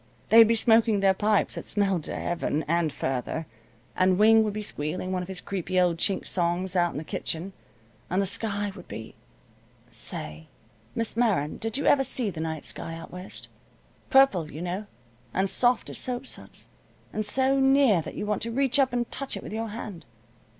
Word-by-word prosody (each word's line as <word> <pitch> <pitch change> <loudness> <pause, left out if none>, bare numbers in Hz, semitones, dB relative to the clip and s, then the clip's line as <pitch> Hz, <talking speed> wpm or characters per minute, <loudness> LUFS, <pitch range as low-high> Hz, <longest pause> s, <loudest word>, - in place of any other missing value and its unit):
They'd 225 0 +8
be 230 - +3
smoking 225 -1 +4
their 195 -1 +5
pipes 210 +1 +1
that - - -4
smelled 195 -5 +1
to - - -4
Heaven, 165 -3 -2
and 170 -1 +1
further, 135 +5 -3 0.5
and 185 0 +3
Wing 220 +2 +6
would 210 -2 -2
be 215 0 -4
squealing 180 0 -3
one 185 -1 -1
of 180 - -6
his 190 -1 -6
creepy 185 -1 -2
old 175 -2 +2
Chink 190 +3 +1
songs 180 +1 -1
out 175 -1 +2
in - - -6
the 150 - -4
kitchen, 165 +4 -4 0.6
and 185 - 0
the 200 - +2
sky 205 0 -2
would 185 - -12
be 110 0 -8 0.8
say, 75 +1 -6 0.5
Miss 230 -2 -1
Meron, 205 -11 +1
did 225 +3 -2
you 285 - -2
ever 270 - +5
see 250 -5 0
the 160 - -8
night 160 -1 -3
sky, 165 - -2
out 165 - -10
West? 180 +1 -8 0.6
Purple, 235 - +4
you 155 - -6
know, 185 +4 -4 0.5
and 190 +1 +2
soft 245 +4 +2
as - - -3
soap 250 0 -2
suds, - - -5 0.4
and 215 - -1
so 265 +5 +2
near 270 -8 +4
that - - -8
you - - -3
want 210 -1 -1
to 230 - -2
reach 265 +2 +2
up 265 -2 +3
and 240 -1 -1
touch 275 0 -1
it - - -8
with - - -7
your 225 +1 -3
hand. 210 -5 -8
200 Hz, 195 wpm, -26 LUFS, 175-230 Hz, 0.8 s, They'd